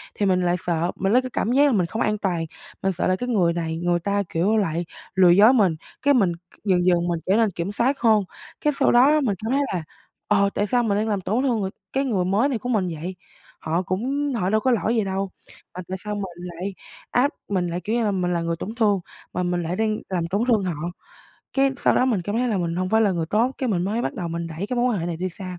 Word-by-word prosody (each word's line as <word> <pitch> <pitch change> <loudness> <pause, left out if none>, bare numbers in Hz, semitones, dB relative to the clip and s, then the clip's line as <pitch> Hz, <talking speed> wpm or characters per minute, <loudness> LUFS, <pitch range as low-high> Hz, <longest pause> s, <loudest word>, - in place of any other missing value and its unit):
thì 205 - 0
mình 185 -2 +2
lại 175 0 +2
sợ, 170 0 0
mình 195 +3 0
lấy 255 - +5
cái 255 - -6
cảm 225 - 0
giác 280 +3 +5
là - - +3
mình 190 -6 +2
không 220 +6 -4
an 210 0 +1
toàn. 175 -5 -1 0.4
Mình 195 - +2
sợ 180 - -1
là 185 - +3
cái 245 +6 -4
người 180 -8 +2
này 165 -1 -3
người 175 0 +1
ta, 200 +3 0
kiểu, 195 +7 +1
lại 170 -4 0 0.3
lừa 185 -2 +6
dối 205 +8 +7
mình, 195 -9 +3 0.3
cái 285 0 +4
mình 200 -9 +3
c 175 +3 -25
dần 180 -3 +2
dần 175 -1 +3
mình 170 -1 -1
trở 190 - +3
nên 225 -3 +3
kiểm 175 +3 -4
soát 255 +6 +1
hơn. 220 -3 +4 0.4
Cái 295 - +2
sau - - +4
đó 245 +2 +6
á 290 - +5
là 305 0 +3
mình 215 -8 0
cảm 225 - -1
thấy 280 - +2
là, 175 -3 -2 0.4
ờ, 200 -1 +3
tại 205 - 0
sao 245 +2 +2
mình 205 -2 +1
đang 220 +1 0
làm 205 -2 0
tổn 220 +8 0
thương 245 -5 +1
người 190 -1 -2 0.2
cái 270 +1 +1
người 195 -8 0
mới 210 +9 +2
này 245 - -1
của 245 - -5
mình 210 -6 +1
vậy, 180 +3 -5 0.4
họ 165 +3 -1
cũng 265 - -1
họ 185 -4 0
đâu 215 - +3
có 260 - +2
lỗi 230 0 +1
gì 220 - +2
đâu, 195 0 -2 0.4
mà 180 - -4
tại 190 +1 -4
sao 210 0 -3
mình 205 - -3
lại 180 +2 -6 0.4
áp 265 +4 +3 0.2
mình 185 -3 0
lại, 175 +1 -3
kiểu 215 +6 -2
như 240 - +1
là, 205 - +1
mình 180 -2 0
là 170 - 0
người 165 0 -1
tổn 215 +7 -6
thương, 210 -4 +2 0.3
mà 180 - -1
mình 175 -1 -1
lại 170 +2 -2
đang 215 +1 0
làm 175 -3 -1
tổn 200 +5 -1
thương 220 -5 +3
họ? 170 -1 -3 0.7
Cái 270 0 +4
sau - - +2
đó - - +3
mình 215 -9 +1
cảm 205 +4 -3
thấy 250 +1 +1
là 215 - 0
mình 170 -1 -2
hông 185 0 -1
phải 220 +2 +3
là 210 -3 +4
người 165 -2 -2
tốt, 230 +9 +1
cái 260 - -1
mình 180 -6 +1
mới 220 +5 -1
bắt - - -2
đầu 175 -5 -4
mình 170 0 -3
đẩy 165 +5 -5
cái 250 - -3
mối 240 +1 +2
quan 215 - 0
hệ 165 - -3
này 170 -2 -3
đi 185 +2 -2
xa. 180 0 -8
195 Hz, 285 wpm, -23 LUFS, 175-225 Hz, 0.7 s, dối